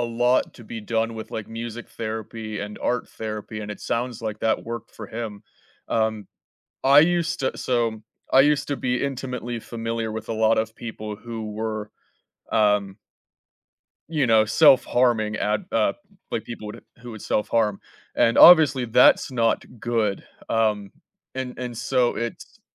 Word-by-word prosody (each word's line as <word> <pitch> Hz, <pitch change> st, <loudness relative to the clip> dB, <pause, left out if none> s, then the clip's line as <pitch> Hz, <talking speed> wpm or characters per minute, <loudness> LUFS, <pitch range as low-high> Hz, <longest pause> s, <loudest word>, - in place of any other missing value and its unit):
lot 120 Hz, +2 st, +1 dB
to 120 Hz, -, -13 dB
be 115 Hz, 0 st, -7 dB
done 115 Hz, +1 st, -1 dB
with, 110 Hz, -, -8 dB
like, 110 Hz, -, -5 dB
music 115 Hz, +1 st, -6 dB
therapy 110 Hz, -1 st, -5 dB
and 105 Hz, +1 st, -6 dB
art 125 Hz, -1 st, -1 dB
therapy, 110 Hz, 0 st, -6 dB
and 105 Hz, 0 st, -6 dB
it 105 Hz, -, -7 dB
sounds, 120 Hz, 0 st, -3 dB
like, 110 Hz, -1 st, -4 dB
that 110 Hz, 0 st, 0 dB
worked 115 Hz, +1 st, -6 dB
for -, -, -8 dB
him. 110 Hz, -3 st, -6 dB, 0.5 s
Um, 110 Hz, -2 st, 0 dB, 0.6 s
I 140 Hz, +2 st, +8 dB
used 170 Hz, +1 st, +1 dB
to 130 Hz, -, -1 dB
so, 115 Hz, -3 st, -1 dB, 0.3 s
I 135 Hz, -, +8 dB
used 145 Hz, 0 st, +2 dB
to 145 Hz, -, -1 dB
be 125 Hz, 0 st, -1 dB
intimately 125 Hz, -3 st, -4 dB
familiar 115 Hz, 0 st, -4 dB
with 110 Hz, 0 st, -6 dB
a -, -, -1 dB
lot 110 Hz, 0 st, +3 dB
of 110 Hz, 0 st, -2 dB
people 110 Hz, -2 st, -6 dB
who 110 Hz, -1 st, -6 dB
were, 110 Hz, -1 st, -4 dB, 0.6 s
um 105 Hz, -3 st, +2 dB, 1.1 s
You 150 Hz, -6 st, 0 dB
know, 110 Hz, -1 st, +5 dB
self-harming 120 Hz, -3 st, +4 dB
at 105 Hz, 0 st, 0 dB
uh, -, -, +2 dB, 0.4 s
like, -, -, -3 dB
people 110 Hz, -3 st, -7 dB, 0.3 s
who 120 Hz, -, -8 dB
would 110 Hz, -3 st, -9 dB
self-harm, 105 Hz, -1 st, 0 dB, 0.3 s
and 115 Hz, -, +3 dB
obviously 150 Hz, -7 st, +8 dB
that's 125 Hz, +3 st, +4 dB
not 115 Hz, -2 st, +1 dB, 0.2 s
good, 110 Hz, -4 st, 0 dB, 0.3 s
um, 105 Hz, -3 st, 0 dB, 0.4 s
and 130 Hz, -1 st, -5 dB
and 125 Hz, -2 st, -5 dB
so 125 Hz, +1 st, +1 dB
it's 115 Hz, +1 st, -6 dB
115 Hz, 155 wpm, -24 LUFS, 110-125 Hz, 1.1 s, I